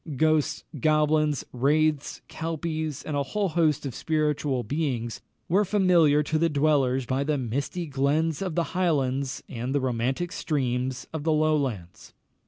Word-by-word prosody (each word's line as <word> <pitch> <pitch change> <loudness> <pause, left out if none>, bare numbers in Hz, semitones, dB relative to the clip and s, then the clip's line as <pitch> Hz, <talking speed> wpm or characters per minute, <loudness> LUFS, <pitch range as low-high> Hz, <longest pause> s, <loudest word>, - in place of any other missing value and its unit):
Ghosts, 155 -1 +2 0.2
goblins, 155 -2 +2
wraiths, 150 +3 +1
kelpies, 160 -2 -4
and 155 - -4
a 140 - +1
whole 195 +8 -1
host 155 -3 +1
of 135 - -4
spiritual 150 -4 0
beings, 125 -3 -2 0.3
were 195 +5 +3
familiar 175 -7 +4
to 155 +1 -1
the 165 +1 +3
dwellers 140 -4 +2
by 130 +3 0
the 150 0 0
misty 140 +8 -3
glens 150 +3 0
of 185 -5 -3
the 170 -1 -1
Highlands 140 -7 0
and 125 +3 -4
the - - +3
romantic 130 +6 -1
streams 130 -3 -2
of 160 -2 -4
the 160 - +1
Lowlands. 140 - -1
150 Hz, 145 wpm, -26 LUFS, 130-160 Hz, 0.3 s, familiar